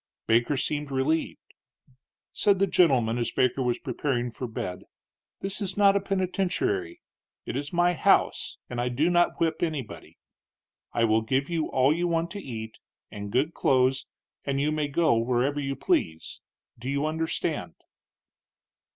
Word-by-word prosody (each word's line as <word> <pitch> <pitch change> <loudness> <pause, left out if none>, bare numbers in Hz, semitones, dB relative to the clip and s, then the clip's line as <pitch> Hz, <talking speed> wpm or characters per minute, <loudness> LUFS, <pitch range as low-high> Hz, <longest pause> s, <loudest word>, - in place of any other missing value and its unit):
Baker 120 +5 +2
seemed 145 +2 -1
relieved. 140 +4 -1 0.8
Said 200 -1 +3
the 195 - +3
gentleman, 125 - +3
as 120 - -1
Baker 130 +1 +1
was 125 -2 +1
preparing 125 -2 -2
for 125 +2 -5
bed: 90 -5 -5 0.6
"This 195 +2 -4
is 195 -1 -2
not 200 -1 +5
a - - +4
penitentiary. 200 - -1 0.4
It - - -4
is 145 +1 -3
my 175 0 +3
house, - - +2
and 120 0 -3
I 125 - 0
do 150 +8 +1
not 175 0 +2
whip 160 -1 0
anybody. 155 -8 -4 0.7
I 115 - +1
will 110 0 +3
give 135 +7 -1
you 165 -2 0
all 130 +3 +3
you 175 +2 0
want 170 0 0
to 205 - -5
eat, 110 - -7 0.3
and 100 -1 -6
good 145 +8 +1
clothes, 130 0 +2 0.4
and 140 -1 -1
you 150 +2 +1
may 155 -1 0
go 160 +1 +2
wherever 125 +4 0
you 135 -1 -2
please. 80 -9 -1 0.4
Do 125 +3 -5
you 140 +2 0
understand?" 160 +1 -2
145 Hz, 155 wpm, -27 LUFS, 125-175 Hz, 0.8 s, not